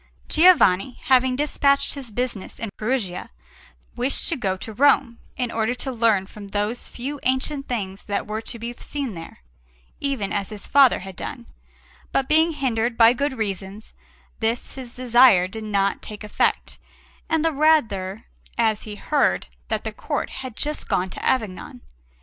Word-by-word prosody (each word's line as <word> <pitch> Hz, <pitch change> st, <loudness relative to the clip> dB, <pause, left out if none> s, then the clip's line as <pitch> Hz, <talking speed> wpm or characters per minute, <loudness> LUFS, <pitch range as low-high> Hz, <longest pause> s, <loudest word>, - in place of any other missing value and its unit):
Giovanni, 270 Hz, -, +5 dB
having 260 Hz, 0 st, +4 dB
dispatched 280 Hz, 0 st, +2 dB
his 275 Hz, -4 st, -7 dB
business 230 Hz, -3 st, -4 dB
in 225 Hz, -3 st, -5 dB
Perugia, 215 Hz, -6 st, -2 dB, 0.7 s
wished 250 Hz, +3 st, 0 dB
to 335 Hz, -, 0 dB
go 195 Hz, -8 st, -1 dB
to 220 Hz, +4 st, -8 dB
Rome, 265 Hz, -1 st, +3 dB, 0.2 s
in 245 Hz, -2 st, -1 dB
order 225 Hz, +2 st, 0 dB
to 265 Hz, +2 st, -3 dB
learn 225 Hz, -5 st, +2 dB
from 205 Hz, +1 st, -11 dB
those 210 Hz, +4 st, -2 dB
few 275 Hz, +4 st, -5 dB
ancient 270 Hz, +2 st, 0 dB
things 195 Hz, -5 st, -4 dB
that 200 Hz, -, -2 dB
were 215 Hz, +1 st, -4 dB
to 235 Hz, -, -5 dB
be 235 Hz, +1 st, -5 dB
seen 275 Hz, -1 st, -5 dB
there, 165 Hz, -, -10 dB, 0.6 s
even 265 Hz, -9 st, -1 dB
as 200 Hz, -1 st, -1 dB
his 210 Hz, -2 st, -6 dB
father 275 Hz, -7 st, +5 dB
had 190 Hz, 0 st, -9 dB
done; -, -, -7 dB, 0.7 s
but 265 Hz, -, +1 dB
being 320 Hz, +2 st, +4 dB
hindered 240 Hz, -4 st, -1 dB
by 230 Hz, 0 st, +7 dB
good 280 Hz, +2 st, -1 dB
reasons, 200 Hz, 0 st, -4 dB, 0.5 s
this 230 Hz, +1 st, -1 dB
his 255 Hz, -3 st, -8 dB
desire 240 Hz, -7 st, +5 dB
did 220 Hz, +3 st, -7 dB
not 200 Hz, -2 st, 0 dB
take 210 Hz, 0 st, -8 dB
effect, 210 Hz, -, 0 dB, 0.5 s
and 320 Hz, 0 st, +1 dB
the 325 Hz, -, +2 dB
rather 220 Hz, -11 st, +2 dB, 0.3 s
as 215 Hz, -1 st, +1 dB
he 210 Hz, -1 st, -6 dB
heard 290 Hz, +7 st, +1 dB, 0.2 s
that -, -, -2 dB
the -, -, -4 dB
Court -, -, -3 dB
had 260 Hz, -4 st, -7 dB
just 300 Hz, 0 st, -3 dB
gone 185 Hz, 0 st, 0 dB
to -, -, -7 dB
Avignon. 195 Hz, -, -1 dB
235 Hz, 160 wpm, -23 LUFS, 205-270 Hz, 0.7 s, by